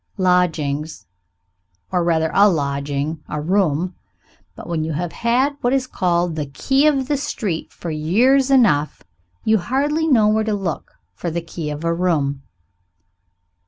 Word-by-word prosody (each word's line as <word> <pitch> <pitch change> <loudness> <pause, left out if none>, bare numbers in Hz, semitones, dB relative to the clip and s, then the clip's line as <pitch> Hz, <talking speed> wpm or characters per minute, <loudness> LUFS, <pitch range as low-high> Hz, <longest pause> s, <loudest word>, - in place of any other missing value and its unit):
Lodgings. 160 -5 0 0.9
Or 180 -2 +1
rather 160 -2 +1
a 205 +1 +6
lodging. 145 -1 -2
A 150 - -3
room. 180 0 0 0.6
But - - -10
when 165 -2 -1
you 160 0 -3
have 170 +3 -3
had 255 +5 0
what 245 +2 +1
is 270 -1 +1
called 175 -7 0
the 150 -2 -3
key 270 - +1
of 275 -4 +1
the 290 - 0
street 220 - -3
for 170 - -6
years 235 - +2
enough, 205 - +3 0.4
you 220 -1 +3
hardly 290 - 0
know 230 -8 +4
where 215 +1 +2
to 215 -1 -1
look 190 -6 -4 0.2
for 175 - -4
the 170 +1 -2
key 165 -2 -6
of 150 +1 -5
a 165 0 +1
room. 155 -6 0
175 Hz, 155 wpm, -20 LUFS, 155-235 Hz, 0.9 s, a